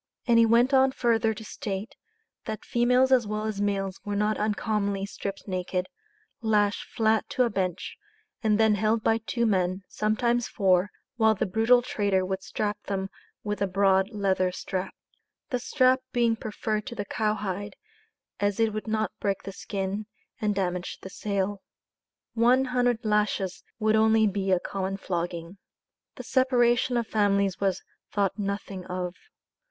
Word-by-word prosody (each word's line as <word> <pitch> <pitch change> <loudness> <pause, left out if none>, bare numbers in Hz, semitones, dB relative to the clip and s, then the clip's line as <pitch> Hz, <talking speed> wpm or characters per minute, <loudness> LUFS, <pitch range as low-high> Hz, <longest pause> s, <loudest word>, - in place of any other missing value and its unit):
And 235 -1 +5
he 230 - +6
went 240 +4 +4
on 265 0 +5
further 230 -4 +2
to 220 - -9
state, 205 +6 -5 0.5
that 220 -1 -5
"females 250 +2 +3
as 245 -4 +4
well 215 +1 -2
as 210 -2 -2
males 195 -2 -1
were 205 0 -3
not 210 +1 +1
uncommonly 205 -2 -1
stripped 200 0 -6
naked, 185 -1 -2 0.6
lashed 210 -2 +1
flat 220 -2 +1
to 255 - +2
a 240 - 0
bench, 185 -3 -3 0.4
and 215 -2 +2
then 220 -1 +5
held 215 +2 +1
by 225 0 +3
two 235 +1 -1
men, 185 -2 +1
sometimes 235 +3 0
four, 185 0 +2 0.3
while 220 -1 +4
the 210 - 0
brutal 225 +5 +4
trader 200 -6 0
would 190 0 -3
strap 210 +1 -3
them 195 -1 -2 0.3
with 210 -1 -3
a 200 - +2
broad 190 0 +3
leather 190 -4 +1
strap." 185 +1 -4 0.6
The 250 - 0
strap 255 0 +3
being 235 -2 +2
preferred 215 -1 -3
to 235 - -6
the 205 -3 -3
cow 215 +1 0
hide, 205 0 -4 0.6
as 205 0 0
it 225 -1 +2
would 215 +1 -4
not 220 0 0
break 200 -1 -1
the 195 - -6
skin, 195 +1 -4 0.3
and 210 -1 +1
damage 180 -2 -2
the 190 - -9
sale. 200 0 -2 0.7
"One 245 +3 +4
hundred 245 -2 0
lashes 210 -3 0
would 220 -1 +2
only 220 0 +4
be 195 -1 0
a 185 - +4
common 195 +1 -3
flogging." 175 0 -4 0.6
The - - -7
separation 245 -1 +2
of 235 - 0
families 200 -3 +1
was 195 -2 0 0.3
thought 200 0 0
nothing 200 -2 -4
of. 180 -1 -3
210 Hz, 160 wpm, -27 LUFS, 195-225 Hz, 0.7 s, he